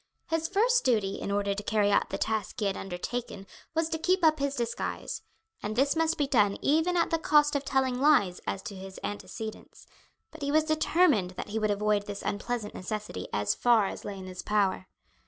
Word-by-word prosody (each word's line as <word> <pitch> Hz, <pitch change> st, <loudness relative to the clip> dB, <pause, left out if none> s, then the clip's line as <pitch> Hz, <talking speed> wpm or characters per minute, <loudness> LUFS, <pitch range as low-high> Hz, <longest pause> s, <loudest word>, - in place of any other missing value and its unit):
His 325 Hz, 0 st, +1 dB
first 475 Hz, +6 st, +3 dB
duty 215 Hz, -7 st, +1 dB
in -, -, -3 dB
order 200 Hz, 0 st, 0 dB
to 200 Hz, -, -4 dB
carry 210 Hz, -1 st, +2 dB
out 200 Hz, -, +2 dB
the -, -, -3 dB
task 220 Hz, +2 st, -2 dB
he 210 Hz, -, 0 dB
had 195 Hz, -1 st, 0 dB
undertaken 195 Hz, +3 st, -5 dB, 0.3 s
was 325 Hz, 0 st, +2 dB
to 320 Hz, -, -2 dB
keep 365 Hz, +1 st, +2 dB
up 310 Hz, -1 st, +4 dB
his 280 Hz, 0 st, -1 dB
disguise, 235 Hz, -2 st, -3 dB, 0.4 s
and 215 Hz, +1 st, -3 dB
this 275 Hz, +5 st, +2 dB
must 325 Hz, 0 st, +1 dB
be 290 Hz, -, +2 dB
done 210 Hz, -7 st, +3 dB
even 320 Hz, +5 st, +2 dB
at 335 Hz, -, +2 dB
the 330 Hz, -, +2 dB
cost 295 Hz, -2 st, +4 dB
of 280 Hz, -, 0 dB
telling 265 Hz, -2 st, 0 dB
lies 210 Hz, -12 st, +4 dB
as 195 Hz, -, -3 dB
to 215 Hz, -4 st, -7 dB
his 190 Hz, 0 st, -9 dB
antecedents; 215 Hz, +1 st, -7 dB, 0.5 s
but 315 Hz, -, -13 dB
he 285 Hz, 0 st, -1 dB
was 310 Hz, +1 st, +4 dB
determined 310 Hz, -, +2 dB
that -, -, -5 dB
he 220 Hz, +2 st, -1 dB
would 215 Hz, -1 st, +1 dB
avoid 205 Hz, 0 st, +1 dB
this 200 Hz, -1 st, -6 dB
unpleasant 210 Hz, +1 st, -3 dB
necessity 205 Hz, -, -5 dB
as 105 Hz, 0 st, +1 dB
far 230 Hz, -, +4 dB
as -, -, -5 dB
lay 200 Hz, -, -6 dB
in 190 Hz, -, -8 dB
his 185 Hz, -1 st, -7 dB
power. 195 Hz, -3 st, 0 dB
220 Hz, 210 wpm, -29 LUFS, 200-300 Hz, 0.5 s, up